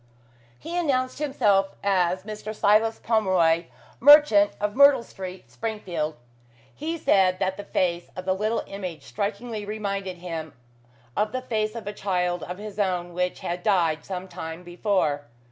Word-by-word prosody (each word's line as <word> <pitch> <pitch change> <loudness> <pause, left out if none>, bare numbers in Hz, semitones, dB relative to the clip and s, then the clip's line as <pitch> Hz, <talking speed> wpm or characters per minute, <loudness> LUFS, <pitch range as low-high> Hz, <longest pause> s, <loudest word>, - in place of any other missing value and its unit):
He 335 - -7
announced 265 -7 0
himself 205 -10 +2
as 185 -2 +1
Mr. 215 +1 -6
Silas 215 +2 +3
Pomeroy, 185 -7 +2 0.3
merchant, 275 -7 +7
of 205 0 -1
Myrtle 280 -2 +7
Street, 185 -4 -9
Springfield. 180 -9 -3 0.6
He 325 +3 -4
said 190 - +3
that 190 +1 -1
the 205 - -8
face 175 -1 -1
of 185 - -6
the 185 - +2
little 215 +4 -1
image 180 -7 -6
strikingly 205 - -4
reminded 200 -3 -4
him 165 -3 -6 0.6
of 210 0 +1
the 255 - -2
face 215 -3 -1
of 230 - -6
a 205 - -4
child 180 -3 -1
of 180 +1 -6
his 210 0 -8
own 180 -3 -1
which 180 +1 -2
had 175 +1 -3
died 170 -6 +2
some 185 -1 -5
time 160 -1 -7
before. 175 -5 0
195 Hz, 150 wpm, -25 LUFS, 180-215 Hz, 0.6 s, merchant